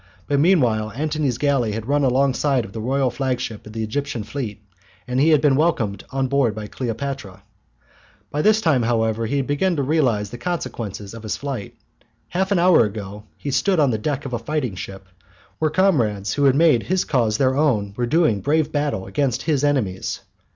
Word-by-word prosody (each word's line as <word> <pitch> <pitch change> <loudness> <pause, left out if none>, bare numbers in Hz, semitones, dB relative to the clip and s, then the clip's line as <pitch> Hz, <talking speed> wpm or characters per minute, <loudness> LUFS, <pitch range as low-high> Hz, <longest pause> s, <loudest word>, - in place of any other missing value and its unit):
But 145 -1 +1
meanwhile 125 - +3
Antony's 150 -3 -1
galley 135 -7 +1
had 110 +1 -4
run 145 +3 +1
alongside 135 0 +2
of 95 - -12
the 110 - -5
royal 130 +2 +1
flagship 125 -5 -3
of 105 - -10
the 110 0 -3
Egyptian 125 +1 -3
fleet, 110 -3 -5 0.5
and 125 +1 -1
he 150 +4 +4
had 155 -3 +5
been 145 -3 +4
welcomed 125 - 0
on 135 -1 -1
board 130 -5 +1
by 110 -1 -5
Cleopatra. 115 -3 -5 0.9
By 150 - 0
this 215 +4 +4
time, 155 - +3
however, 115 -1 0
he 140 - -1
had 135 - 0
begun 170 +6 +1
to 140 - 0
realize 130 -9 +1
the 120 - -8
consequences 115 - -4
of 115 - -8
his 110 -2 -3
flight. 135 -8 -5 0.5
Half 190 +2 -1
an 200 - +3
hour 175 -6 +5
ago 105 -1 -6
he 145 - -5
had - - -2
stood 190 +2 +2
on 140 -4 +4
the 110 - -1
deck 140 +4 -2
of 130 - -5
a 120 - -1
fighting 130 -2 -2
ship, 95 +1 -8 0.5
where 155 - +2
comrades 115 - +1
who 145 - +1
had 135 -1 +5
made 155 -6 +4
his 185 +6 0
cause 115 -6 +1
their 130 0 +2
own 115 -10 +1
were 120 +1 -1
doing 135 - +2
brave 155 +1 +1
battle 145 -10 -1
against 125 +5 -1
his 150 -4 0
enemies. 125 -11 -1
130 Hz, 200 wpm, -22 LUFS, 110-145 Hz, 0.9 s, had